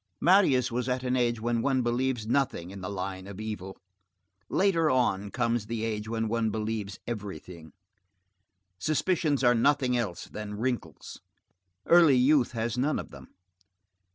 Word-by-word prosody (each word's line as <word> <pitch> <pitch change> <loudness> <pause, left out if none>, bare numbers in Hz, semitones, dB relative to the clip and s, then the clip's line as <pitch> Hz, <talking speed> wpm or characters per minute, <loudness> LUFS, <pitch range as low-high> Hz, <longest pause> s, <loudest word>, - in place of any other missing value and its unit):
Marius 145 -8 +4
was 125 +2 -2
at 125 0 -1
an 125 0 0
age 120 -2 +1
when 115 +1 0
one 130 0 +1
believes 120 -1 -1
nothing 115 -8 -1
in 100 -1 -9
the 90 - -5
line 95 -1 -5
of 100 0 -9
evil; 105 -3 -6 0.7
later 170 -5 +2
on 105 -7 +1
comes 120 -1 -1
the 115 0 -3
age 110 -1 -3
when 110 -1 -1
one 115 0 0
believes 105 -2 -3
everything. 90 -7 -7 1.1
Suspicions 155 - 0
are 120 -1 +5
nothing 130 +1 +2
else 105 -8 -2
than 105 -1 -7
wrinkles. 115 -9 -4 0.6
Early 165 -6 +6
youth 130 0 +3
has 115 +1 -2
none 145 +4 +1
of - - -7
them. - - -12
120 Hz, 150 wpm, -28 LUFS, 105-130 Hz, 1.1 s, Early